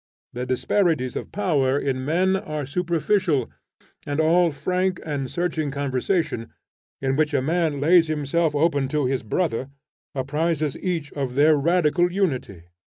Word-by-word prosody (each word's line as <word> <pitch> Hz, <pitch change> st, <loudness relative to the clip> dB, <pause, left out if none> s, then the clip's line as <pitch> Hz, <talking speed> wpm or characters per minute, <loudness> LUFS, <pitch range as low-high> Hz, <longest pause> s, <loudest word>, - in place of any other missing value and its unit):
The 125 Hz, +1 st, -4 dB
disparities 130 Hz, -, +1 dB
of -, -, -5 dB
power 140 Hz, -9 st, +1 dB
in 135 Hz, -2 st, -1 dB
men 180 Hz, +6 st, +2 dB
are 155 Hz, -7 st, -3 dB
superficial; 170 Hz, -, 0 dB, 0.5 s
and 145 Hz, +1 st, -3 dB
all 170 Hz, +2 st, +4 dB
frank 180 Hz, +4 st, -1 dB
and 140 Hz, -4 st, -3 dB
searching 165 Hz, -4 st, -1 dB
conversation, 140 Hz, -, -1 dB, 0.5 s
in 135 Hz, 0 st, 0 dB
which 150 Hz, 0 st, +1 dB
a -, -, +4 dB
man 160 Hz, -1 st, 0 dB
lays 165 Hz, +3 st, +5 dB
himself 155 Hz, +1 st, 0 dB
open 145 Hz, -3 st, +2 dB
to 150 Hz, 0 st, 0 dB
his 130 Hz, 0 st, 0 dB
brother, 130 Hz, -, -1 dB, 0.5 s
apprises 150 Hz, +2 st, -1 dB
each 165 Hz, -6 st, -3 dB
of 135 Hz, -3 st, -3 dB
their 150 Hz, +3 st, +5 dB
radical 175 Hz, +3 st, +2 dB
unity. 135 Hz, -, -2 dB
150 Hz, 140 wpm, -23 LUFS, 135-175 Hz, 0.5 s, lays